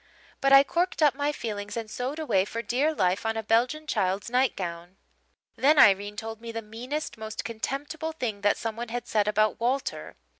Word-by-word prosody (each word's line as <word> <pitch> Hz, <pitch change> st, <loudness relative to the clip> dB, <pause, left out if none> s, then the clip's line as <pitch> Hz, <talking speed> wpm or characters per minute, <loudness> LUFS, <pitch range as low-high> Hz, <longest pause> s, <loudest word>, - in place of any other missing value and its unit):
But 275 Hz, -, +3 dB
I 275 Hz, 0 st, +9 dB
corked 340 Hz, +2 st, 0 dB
up 290 Hz, -4 st, +5 dB
my 285 Hz, +2 st, -1 dB
feelings 205 Hz, -6 st, -5 dB
and 225 Hz, -1 st, -4 dB
sewed 250 Hz, +6 st, -4 dB
away 205 Hz, -12 st, +2 dB
for 230 Hz, +3 st, -5 dB
dear 275 Hz, +7 st, +1 dB
life 185 Hz, -9 st, 0 dB
on 225 Hz, 0 st, -1 dB
a 220 Hz, -, -2 dB
Belgian 250 Hz, +8 st, +1 dB
child's 200 Hz, -5 st, -1 dB
nightgown. 185 Hz, -8 st, -1 dB, 0.6 s
"Then 295 Hz, +3 st, +4 dB
Irene 205 Hz, -3 st, +5 dB
told 225 Hz, +1 st, -6 dB
me 230 Hz, 0 st, -6 dB
the 225 Hz, 0 st, -5 dB
meanest, 240 Hz, +5 st, -5 dB
most 220 Hz, 0 st, -5 dB
contemptible 285 Hz, +7 st, -4 dB
thing 230 Hz, -9 st, -4 dB
that 205 Hz, 0 st, +2 dB
someone 230 Hz, +1 st, -4 dB
had 240 Hz, +1 st, -4 dB
said 210 Hz, -1 st, +1 dB
about 215 Hz, 0 st, +2 dB
Walter. 255 Hz, +4 st, -2 dB
230 Hz, 185 wpm, -27 LUFS, 210-275 Hz, 0.6 s, I